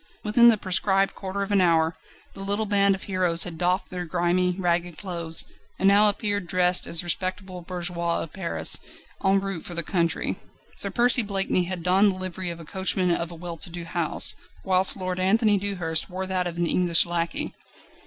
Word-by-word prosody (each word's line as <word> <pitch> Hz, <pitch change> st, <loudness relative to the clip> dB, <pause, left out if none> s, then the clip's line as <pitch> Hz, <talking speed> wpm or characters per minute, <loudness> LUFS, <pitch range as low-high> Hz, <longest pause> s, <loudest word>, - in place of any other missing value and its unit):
Within 225 Hz, +3 st, +5 dB
the 230 Hz, -2 st, +6 dB
prescribed 195 Hz, +1 st, +1 dB
quarter 195 Hz, +1 st, -5 dB
of 200 Hz, -, -6 dB
an 200 Hz, -2 st, +3 dB
hour 165 Hz, -2 st, +2 dB, 0.4 s
the -, -, -12 dB
little 200 Hz, +2 st, -2 dB
band 200 Hz, -1 st, +2 dB
of 190 Hz, -, -10 dB
heroes 180 Hz, -3 st, +3 dB
had 170 Hz, -3 st, -6 dB
doffed 180 Hz, +2 st, -1 dB
their 180 Hz, -1 st, -4 dB
grimy, 175 Hz, +1 st, 0 dB
ragged 175 Hz, -2 st, -1 dB
clothes, 170 Hz, -4 st, -2 dB, 0.3 s
and 195 Hz, -, +1 dB
now 205 Hz, +2 st, +5 dB
appeared 205 Hz, -3 st, -2 dB
dressed 180 Hz, 0 st, +1 dB
as 170 Hz, -, +3 dB
respectable 185 Hz, +1 st, -4 dB
bourgeois 175 Hz, -1 st, -3 dB
of 165 Hz, -, -11 dB
Paris 180 Hz, -3 st, +4 dB, 0.4 s
en 195 Hz, 0 st, +3 dB
route 195 Hz, -4 st, -5 dB
for 175 Hz, -, -8 dB
the 170 Hz, -, -1 dB
country. 170 Hz, -1 st, -1 dB, 0.4 s
Sir -, -, -1 dB
Percy 245 Hz, +1 st, +4 dB
Blakeney 195 Hz, -3 st, 0 dB
had 180 Hz, -1 st, -5 dB
donned 190 Hz, +3 st, +3 dB
the -, -, -10 dB
livery 185 Hz, -1 st, -4 dB
of 170 Hz, -1 st, -7 dB
a 165 Hz, -, -11 dB
coachman 190 Hz, +1 st, -1 dB
of 170 Hz, 0 st, -2 dB
a 170 Hz, -, -10 dB
well 170 Hz, 0 st, -7 dB
to 175 Hz, -, -1 dB
do 170 Hz, 0 st, -7 dB
house, 165 Hz, -1 st, +3 dB, 0.3 s
whilst 190 Hz, 0 st, +3 dB
Lord 185 Hz, -1 st, -4 dB
Anthony 205 Hz, +2 st, +2 dB
Dewhurst 180 Hz, -5 st, -3 dB
wore 190 Hz, +1 st, -4 dB
that 185 Hz, -1 st, -2 dB
of 170 Hz, -1 st, -7 dB
an 175 Hz, -, 0 dB
English 170 Hz, -1 st, +3 dB
lacquey. 170 Hz, -1 st, -3 dB
185 Hz, 195 wpm, -24 LUFS, 170-195 Hz, 0.4 s, the